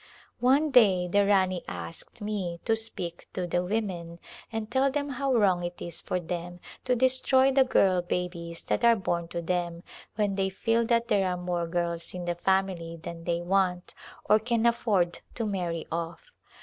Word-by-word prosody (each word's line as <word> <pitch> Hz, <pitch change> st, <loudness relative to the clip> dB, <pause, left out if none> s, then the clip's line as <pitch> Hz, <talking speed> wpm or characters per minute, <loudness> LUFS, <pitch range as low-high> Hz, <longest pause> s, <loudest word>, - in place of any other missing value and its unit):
One 280 Hz, +5 st, +3 dB
day 195 Hz, -8 st, +5 dB
the 200 Hz, +2 st, +3 dB
Rani 185 Hz, -3 st, +2 dB
asked 85 Hz, -, -7 dB
me 190 Hz, -5 st, -3 dB
to 225 Hz, -, +3 dB
speak 180 Hz, -6 st, -5 dB
to 185 Hz, -, -2 dB
the 175 Hz, +1 st, 0 dB
women 180 Hz, -4 st, -3 dB, 0.3 s
and 225 Hz, -1 st, -4 dB
tell 265 Hz, +2 st, +3 dB
them 285 Hz, +1 st, -2 dB
how 275 Hz, 0 st, -1 dB
wrong 195 Hz, -7 st, +3 dB
it 175 Hz, 0 st, -5 dB
is 170 Hz, -1 st, -5 dB
for 180 Hz, -, -2 dB
them 175 Hz, +1 st, -5 dB, 0.3 s
to 250 Hz, -, +2 dB
destroy 260 Hz, +1 st, +4 dB
the 270 Hz, 0 st, +5 dB
girl 190 Hz, -8 st, +3 dB
babies 175 Hz, -1 st, -4 dB
that -, -, -1 dB
are 235 Hz, 0 st, +6 dB
born 175 Hz, -4 st, -2 dB
to 170 Hz, 0 st, -5 dB
them, 175 Hz, 0 st, -2 dB, 0.3 s
when 205 Hz, -2 st, +1 dB
they 195 Hz, 0 st, 0 dB
feel 225 Hz, +4 st, +1 dB
that 235 Hz, 0 st, +2 dB
there 195 Hz, -2 st, +2 dB
are 180 Hz, -1 st, -1 dB
more 175 Hz, -1 st, -2 dB
girls 170 Hz, 0 st, -2 dB
in 180 Hz, -1 st, -5 dB
the 175 Hz, -, 0 dB
family 175 Hz, -2 st, 0 dB
than 165 Hz, +1 st, -8 dB
they 170 Hz, -1 st, 0 dB
want 180 Hz, 0 st, 0 dB, 0.3 s
or 215 Hz, +1 st, +5 dB
can 230 Hz, +1 st, 0 dB
afford 205 Hz, -7 st, +2 dB, 0.2 s
to 230 Hz, -, -1 dB
marry 175 Hz, -5 st, -2 dB
off. 170 Hz, -, -5 dB
185 Hz, 180 wpm, -28 LUFS, 175-225 Hz, 0.3 s, are